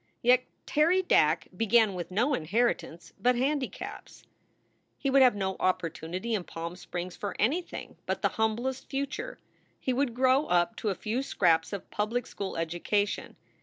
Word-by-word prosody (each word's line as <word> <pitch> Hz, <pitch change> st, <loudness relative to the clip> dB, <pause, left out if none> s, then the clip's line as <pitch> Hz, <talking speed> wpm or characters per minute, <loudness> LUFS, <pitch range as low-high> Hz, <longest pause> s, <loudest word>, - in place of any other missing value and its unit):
Yet 250 Hz, +1 st, +5 dB, 0.2 s
Terry 340 Hz, +5 st, +3 dB
Dack -, -, +3 dB
began 225 Hz, -2 st, +4 dB
with 175 Hz, -2 st, -5 dB
no 235 Hz, +10 st, +1 dB
inheritance 175 Hz, -, -1 dB
but 250 Hz, +1 st, +3 dB
handicaps. 270 Hz, +2 st, -3 dB, 0.7 s
He 275 Hz, -, -1 dB
would 275 Hz, 0 st, +6 dB
have 250 Hz, -4 st, +6 dB
no 190 Hz, -1 st, -2 dB
opportunity 185 Hz, +4 st, -1 dB
in 205 Hz, -4 st, 0 dB
Palm 170 Hz, +1 st, -6 dB
Springs 180 Hz, 0 st, -6 dB
for 205 Hz, -, -4 dB
any 280 Hz, -, +2 dB
thing 350 Hz, -, -9 dB
but -, -, -2 dB
the -, -, +4 dB
humblest 235 Hz, +4 st, -1 dB
future. 280 Hz, 0 st, -3 dB, 0.4 s
He 255 Hz, -, -1 dB
would 250 Hz, -2 st, 0 dB
grow 260 Hz, +3 st, +3 dB
up 175 Hz, +6 st, +2 dB
to 215 Hz, -, -1 dB
a 195 Hz, -, -1 dB
few 225 Hz, +7 st, -2 dB
scraps 165 Hz, -10 st, +2 dB
of 200 Hz, -2 st, -6 dB
public 220 Hz, +4 st, -1 dB
school 195 Hz, -2 st, -5 dB
education. 175 Hz, +5 st, -1 dB
220 Hz, 160 wpm, -29 LUFS, 185-255 Hz, 0.7 s, would